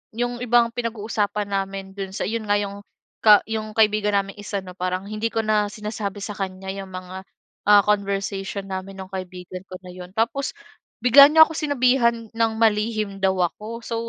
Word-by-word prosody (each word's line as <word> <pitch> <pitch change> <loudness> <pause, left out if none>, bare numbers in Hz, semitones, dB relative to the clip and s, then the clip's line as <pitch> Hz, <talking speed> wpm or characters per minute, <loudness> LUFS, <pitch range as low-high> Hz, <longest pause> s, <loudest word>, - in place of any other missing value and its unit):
'yong 245 +1 -2
ibang 240 -1 +4
pinag-uusapan 215 -3 -2
namin 195 -1 -3
do'n 195 -1 -4
sa - - -2
'yon 225 +1 -3
nga, 205 - +4
'yong 200 0 -4 0.4
ka 210 -2 +7
'yong 215 -1 -3
kaibigan 210 -1 +3
naming 195 0 -3
isa 205 -1 -3
'no, 180 - -9
parang 185 +1 -2
hindi 215 +2 -2
ko 225 - -1
na 210 -1 +2
sinasabi 210 -1 -5
sa 210 - -4
kanya 190 -1 -5
'yong 195 -1 -7
mga, 185 +1 -8 0.5
ah, 205 -1 +8
conversation 200 -1 -1
namin 190 0 -6
no'ng 190 0 -10
kaibigan 185 -1 -7
ko 185 - -7
na 180 - -9
'yon. 180 0 -10
Tapos 250 +5 -1 0.5
bigla 275 +3 +9
niya 320 +1 +8
ako - - -10
sinabihan 250 -5 +2
ng 225 -1 +1
malihim 215 -2 +1
daw 190 -1 +3
ako. 215 +6 -2
So, 230 - -3
210 Hz, 180 wpm, -23 LUFS, 195-225 Hz, 0.5 s, bigla